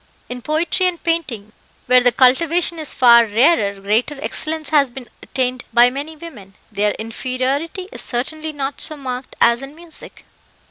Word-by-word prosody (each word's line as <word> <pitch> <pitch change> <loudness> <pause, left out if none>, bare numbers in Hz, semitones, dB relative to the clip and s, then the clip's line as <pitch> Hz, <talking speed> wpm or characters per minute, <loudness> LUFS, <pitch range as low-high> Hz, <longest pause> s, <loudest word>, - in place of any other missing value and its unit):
In 245 0 -6
poetry 320 +6 0
and 350 -2 -4
painting, 275 -11 -2 0.3
where 250 0 +6
the 245 0 +4
cultivation 325 +7 +2
is 310 - -5
far 235 -2 +6
rarer, 210 -3 +2
greater 220 +9 0
excellence 310 +1 -2
has 285 -4 +3
been 245 0 -10
attained 255 -1 -2
by 240 +2 +5
many 290 +4 -6
women. 225 - -12 0.2
Their 205 0 0
inferiority 260 - -3
is - - -7
certainly 310 +6 -3
not 280 -1 -4
so 310 - -2
marked 255 -2 -6
as 235 +1 +4
in 275 +2 -9
music." 335 0 -11
265 Hz, 155 wpm, -19 LUFS, 240-315 Hz, 0.3 s, where